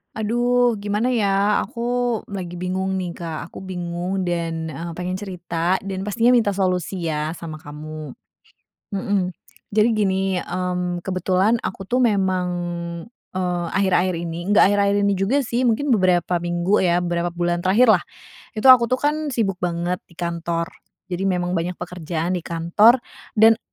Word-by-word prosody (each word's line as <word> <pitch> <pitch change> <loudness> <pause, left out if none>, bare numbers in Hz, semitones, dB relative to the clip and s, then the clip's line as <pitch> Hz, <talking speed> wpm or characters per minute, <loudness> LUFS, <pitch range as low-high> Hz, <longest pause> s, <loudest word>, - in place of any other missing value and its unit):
Aduh 240 +2 +2
gimana 205 +3 -1
ya? 205 -3 +2
Aku 220 - -10 0.5
lagi 180 -3 -6
bingung 190 +1 -1
nih, 175 -2 -4
Kak. 165 -1 -5
Aku 180 - -10
bingung 180 0 -3
dan, 165 -2 -2
eee, 165 +2 -6
pengen 180 +2 -4
cerita 180 -2 -2
dan 195 -1 -5
pastinya 230 +5 +3
minta 220 -4 +3
solusi 185 -2 -1
ya 155 0 -1
sama 165 -1 -7
kamu. 155 0 -8 0.8
Mhm, 195 -2 0 0.4
jadi 215 +2 +4
gini, 190 -3 +1
mmm, 180 -1 -3
kebetulan 185 +3 +2
aku 190 0 -5
tuh 250 +5 +1
memang, 190 -5 +2 0.8
eee, 180 -2 -2
akhir-akhir 185 -1 +2
ini 170 +3 -4
nggak 205 - +6
akhir-akhir 200 0 +2
ini 200 - +2
juga 195 +9 +1
sih, 245 -2 -1
mungkin 245 +3 +1
beberapa 180 -3 +2
minggu 175 +4 +1
ya, 175 -1 +3
beberapa 175 0 -1
bulan 175 0 -1
terakhirlah. 205 0 +5 0.5
Itu 220 +5 +6
aku 245 -2 +8
tuh 255 +2 -1
kan 295 -1 0
sibuk 195 -6 0
banget 175 0 -1
di 170 - -21
kantor. 170 0 -2 0.4
Jadi 185 +2 -1
memang 180 -1 0
banyak 175 +2 -2
pekerjaan 175 0 -3
di - - -10
kantor 205 +9 +4 0.3
dan 225 +1 +6
185 Hz, 150 wpm, -22 LUFS, 175-205 Hz, 0.8 s, aku